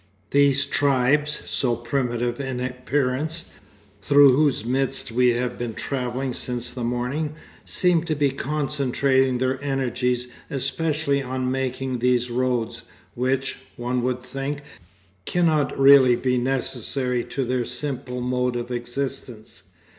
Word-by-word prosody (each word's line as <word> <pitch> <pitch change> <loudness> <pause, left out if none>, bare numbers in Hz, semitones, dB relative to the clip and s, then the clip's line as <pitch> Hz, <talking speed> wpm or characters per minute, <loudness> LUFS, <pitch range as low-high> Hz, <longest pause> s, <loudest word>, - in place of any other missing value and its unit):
These 140 0 +4
tribes, 145 +2 +2
so 120 -3 +1
primitive 120 0 -2
in 135 -2 -3
appearance, 130 +5 -2 0.5
through 140 +1 +6
whose 140 -6 +2
midst 130 0 0
we 125 +2 +3
have 125 +1 -2
been 120 -2 -4
travelling 130 -1 -3
since 120 -1 -3
the 125 -1 -5
morning, 125 +6 -2 0.3
seem 180 -3 +2
to 160 -2 -1
be 145 -2 +2
concentrating 135 -2 +1
their 130 +2 -1
energies 125 -2 -1 0.2
especially 140 +1 0
on 130 -1 -2
making 130 -1 -2
these 125 0 +1
roads, 125 -2 -1 0.3
which, 130 +2 -1 0.2
one 125 +1 -1
would 125 0 -2
think, 135 +3 -4 0.6
cannot 160 -4 +1
really 135 -2 +7
be 125 0 0
necessary 125 -1 -1
to 135 - -3
their 125 0 0
simple 125 0 -4
mode 125 0 0
of 120 +1 -4
existence. 120 -2 -5
130 Hz, 125 wpm, -23 LUFS, 125-140 Hz, 0.6 s, really